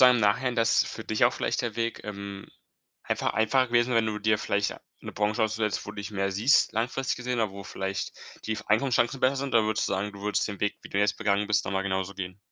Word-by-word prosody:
sagen, 125 Hz, 0 st, +8 dB
im -, -, 0 dB
Nachhinein, 120 Hz, +4 st, +2 dB
dass 115 Hz, -1 st, +4 dB
für -, -, -7 dB
dich -, -, +2 dB
auch -, -, +4 dB
vielleicht -, -, -1 dB
der 115 Hz, -3 st, -3 dB
Weg, 115 Hz, 0 st, -2 dB
ähm, 100 Hz, -1 st, -7 dB, 0.6 s
einfach -, -, -1 dB
einfacher 130 Hz, +4 st, +3 dB
gewesen 120 Hz, 0 st, +3 dB
wäre, 115 Hz, -, +5 dB
wenn 110 Hz, -, +1 dB
du 105 Hz, -1 st, -2 dB
dir 105 Hz, 0 st, +2 dB
vielleicht 100 Hz, 0 st, 0 dB, 0.3 s
'ne -, -, -8 dB
Branche 105 Hz, +1 st, 0 dB
ausgesucht 110 Hz, 0 st, 0 dB
hättest 105 Hz, -, -3 dB
wo -, -, -5 dB
du -, -, -13 dB
dich 100 Hz, +2 st, -5 dB
mehr 100 Hz, -1 st, -1 dB
siehst, 110 Hz, +9 st, +4 dB
langfristig 125 Hz, +4 st, -1 dB
gesehen 125 Hz, 0 st, -2 dB
oder 110 Hz, -3 st, +1 dB
wo 100 Hz, 0 st, -9 dB
vielleicht 95 Hz, 0 st, -4 dB, 0.3 s
die 110 Hz, -1 st, -1 dB
Einkommenschancen 120 Hz, +3 st, +2 dB
besser 135 Hz, +2 st, +3 dB
sind? 135 Hz, -2 st, -3 dB
Oder 115 Hz, -2 st, +5 dB
würdest 110 Hz, 0 st, 0 dB
du -, -, -2 dB
sagen, 100 Hz, +2 st, -1 dB
du 100 Hz, -, -11 dB
würdest 105 Hz, +1 st, 0 dB
den 100 Hz, -2 st, -6 dB
Weg, 105 Hz, -, -1 dB
wie -, -, -10 dB
du 100 Hz, -, -2 dB
jetzt 105 Hz, 0 st, +2 dB
begangen 105 Hz, -2 st, +1 dB
bist, 105 Hz, 0 st, +2 dB
noch 95 Hz, -, -3 dB
mal 95 Hz, -, 0 dB
genauso 95 Hz, 0 st, -2 dB
gehen? 95 Hz, 0 st, -6 dB
105 Hz, 260 wpm, -27 LUFS, 100-115 Hz, 0.6 s, sagen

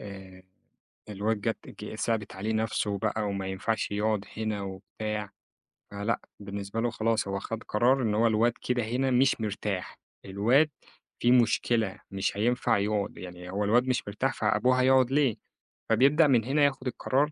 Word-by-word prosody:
آآ 95 Hz, -2 st, -10 dB, 0.7 s
الواد 105 Hz, +1 st, -1 dB
جات 115 Hz, +2 st, -1 dB, 0.3 s
ج 110 Hz, -, -6 dB
صعبت 110 Hz, -3 st, -2 dB
عليه 105 Hz, +4 st, -2 dB
نَفْسه 110 Hz, -2 st, -1 dB
بقى، 110 Hz, +1 st, -1 dB
وما 100 Hz, -1 st, -3 dB
ينفعش 100 Hz, +4 st, -2 dB
يقعُد 105 Hz, 0 st, 0 dB
هنا 110 Hz, -2 st, -2 dB
وبتاع. 105 Hz, +2 st, -5 dB, 0.6 s
فلأ، 100 Hz, +3 st, -2 dB, 0.2 s
بالنسبة 100 Hz, +1 st, -5 dB
له 120 Hz, -, +1 dB
خلاص 110 Hz, -2 st, 0 dB
هو 100 Hz, 0 st, -2 dB
خَد 115 Hz, +3 st, -5 dB
قرار 125 Hz, +5 st, +2 dB
إن 105 Hz, -3 st, 0 dB
هو 115 Hz, +2 st, +4 dB
الواد 115 Hz, +2 st, +3 dB
كده 125 Hz, -1 st, 0 dB
هنا 125 Hz, +4 st, 0 dB
مش 130 Hz, -1 st, +3 dB
مرتاح، 105 Hz, -3 st, -3 dB, 0.3 s
الواد 115 Hz, +10 st, +3 dB, 0.5 s
فيه 120 Hz, -, +3 dB
مشكلة 115 Hz, -3 st, +2 dB
مش 100 Hz, +1 st, -2 dB
هينفع 115 Hz, 0 st, +2 dB
يقعُد. 105 Hz, 0 st, -1 dB
يعني 90 Hz, 0 st, -9 dB
هو 100 Hz, +2 st, -1 dB
الواد 120 Hz, +5 st, +3 dB
مش 125 Hz, -, 0 dB
مرتاح، 130 Hz, +6 st, -1 dB
فأبوه 130 Hz, 0 st, +2 dB
هيقعُد 130 Hz, -1 st, +4 dB
ليه؟ 135 Hz, -5 st, +3 dB, 0.5 s
فبيبدأ 140 Hz, +7 st, +5 dB
من 120 Hz, -5 st, +4 dB
هنا 145 Hz, +4 st, +2 dB
ياخُد 135 Hz, -2 st, -1 dB
القرار 140 Hz, +4 st, 0 dB
110 Hz, 160 wpm, -28 LUFS, 100-125 Hz, 0.7 s, فبيبدأ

